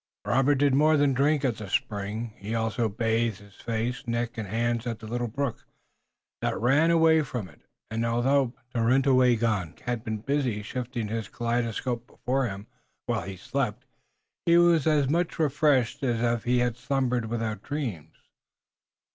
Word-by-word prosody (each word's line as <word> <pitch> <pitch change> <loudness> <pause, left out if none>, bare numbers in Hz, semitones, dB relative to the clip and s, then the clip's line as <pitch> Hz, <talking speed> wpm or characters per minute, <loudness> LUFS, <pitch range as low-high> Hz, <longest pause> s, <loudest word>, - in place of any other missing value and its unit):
Robert 135 +3 +3
did 140 0 +3
more 155 +3 +4
than 145 -1 +3
drink 140 +2 +2
at 120 -4 0
the 105 -3 -7
spring; 105 +3 -2
he 105 +3 -4
also 115 0 0
bathed 115 0 0
his 100 0 -17
face, 120 +3 -3
neck 120 0 -2
and 110 -3 -4
hands 115 +3 -1
at 115 -2 -2
the 110 - -11
little 120 +2 -2
brook 135 +2 -3 0.7
that - - -1
ran 140 +8 +4
away 160 -1 +5
from 120 -8 -4
it, 75 - -19 0.3
and 115 +1 -1
although 120 +3 +2 0.2
Tarenyawagon 120 - +2
had 120 -3 -2
been 110 -2 -3
busy 125 -3 -1
shifting 120 +1 -4
his 110 -1 -4
kaleidoscope 120 0 -2
before 130 0 -1
him 100 0 -7 0.4
while 115 -4 -1
he 95 -1 -6
slept, 120 +2 -3 0.6
he 170 0 +6
was 170 -3 +4
as 150 -3 +3
much 170 +4 0
refreshed 145 -5 +2
as 120 -4 0
if 120 -1 0
he 125 +1 +2
had 120 -1 +1
slumbered 125 -3 0
without 115 -1 -3
dreams. 110 - -5
120 Hz, 160 wpm, -27 LUFS, 110-135 Hz, 0.7 s, he